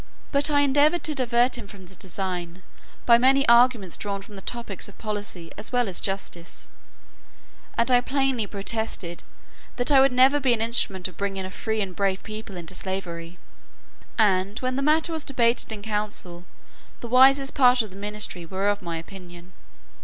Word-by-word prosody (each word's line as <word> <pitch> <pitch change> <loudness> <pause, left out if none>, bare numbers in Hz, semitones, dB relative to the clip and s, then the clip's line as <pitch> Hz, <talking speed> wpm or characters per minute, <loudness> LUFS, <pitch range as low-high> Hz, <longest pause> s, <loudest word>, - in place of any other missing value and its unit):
But 285 +1 +2
I 290 -1 +3
endeavoured 290 +4 +3
to 310 - 0
divert 245 -2 +1
him 210 - -9
from 195 -2 -13
this 190 +2 -9
design, 180 -2 -5 0.4
by 235 -1 +6
many 270 +2 +4
arguments 235 -6 +4
drawn 200 -1 -4
from 210 0 -13
the 195 - -9
topics 235 -4 -4
of 205 - -16
policy 205 -6 -5
as 210 - -5
well 245 -2 +1
as 185 - -4
justice; 190 -3 -4 1.1
and 235 +2 +2
I 245 -1 +5
plainly 265 -4 0
protested, 200 -4 -3 0.5
"that 245 +3 0
I 275 - +7
would 270 0 +4
never 260 +3 +5
be 260 -3 +2
an 230 - -1
instrument 205 -5 +4
of 185 - -15
bringing 195 -1 -3
a 185 - -7
free 220 +2 -3
and 190 -3 -4
brave 195 -1 -1
people 215 -3 -8
into 170 +1 -5
slavery." 175 -3 -6 0.8
And, 200 -1 +2
when 255 0 -2
the 275 - -1
matter 315 +3 +2
was 320 -2 -4
debated 235 -4 +1
in 210 -2 -6
council, 205 -5 -3 0.6
the 240 - -6
wisest 270 +3 +5
part 250 -2 +4
of 215 - -10
the - - -13
ministry 205 -3 -2
were 190 +4 -1
of 205 0 -1
my 170 -2 -4
opinion. 175 0 -12
210 Hz, 180 wpm, -24 LUFS, 190-250 Hz, 1.1 s, I